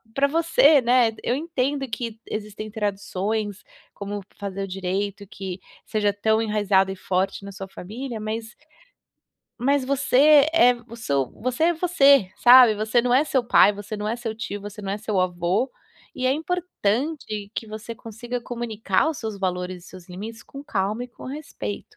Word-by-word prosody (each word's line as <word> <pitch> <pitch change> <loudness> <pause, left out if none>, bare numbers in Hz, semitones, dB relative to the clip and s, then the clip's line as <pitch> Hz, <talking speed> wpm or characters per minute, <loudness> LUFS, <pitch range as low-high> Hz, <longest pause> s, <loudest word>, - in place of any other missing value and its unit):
pra 280 +1 +3
você, 315 -1 +5
né. 240 -1 +4
Eu 245 - +1
entendo 280 -3 -1
que 225 -1 -4
existem 215 0 -6
tradições, 205 0 -2 0.3
como 205 0 -5 0.2
fazer 195 -1 -4
o 195 - -4
direito, 195 +2 -3
que 190 -1 -7 0.3
seja 210 -1 0
tão 220 +2 +1
enraizada 205 -3 +2
e 190 - -5
forte 190 +2 -1
na 200 - -7
sua 195 0 -8
família, 225 +6 -7
mas 220 +1 -5 1.0
mas 275 +2 +2
você 280 +2 +5
é 250 -7 +6
o 230 - -10
seu 140 - -1
você 255 +5 0
é 345 - +3
você, 280 - +4
sabe? 245 -2 +8
Você 220 +3 +1
não 245 0 +1
é 285 +4 +5
seu 265 -4 +1
pai, 210 -3 +6
você 205 +1 -7
não 210 0 -4
é 230 - 0
seu 230 -2 -4
tio, 205 -2 -5
você 205 +1 -8
não 195 0 -3
é 205 - -3
seu 210 -2 -2
avô, 180 +7 0 0.5
e 255 - -1
é 260 - +4
importante 290 - -2
que 225 - -4
você 220 +2 -7
consiga 240 +2 -6
comunicar 235 -1 -1
os 310 - -6
seus 220 -3 -5
valores 180 -1 -3
e - - -13
seus 185 -1 -13
limites 215 +5 -8
com 275 +1 -11
calma 210 +1 -1
e 250 - -11
com - - -14
respeito. 255 - -6
220 Hz, 175 wpm, -24 LUFS, 200-255 Hz, 1.0 s, sabe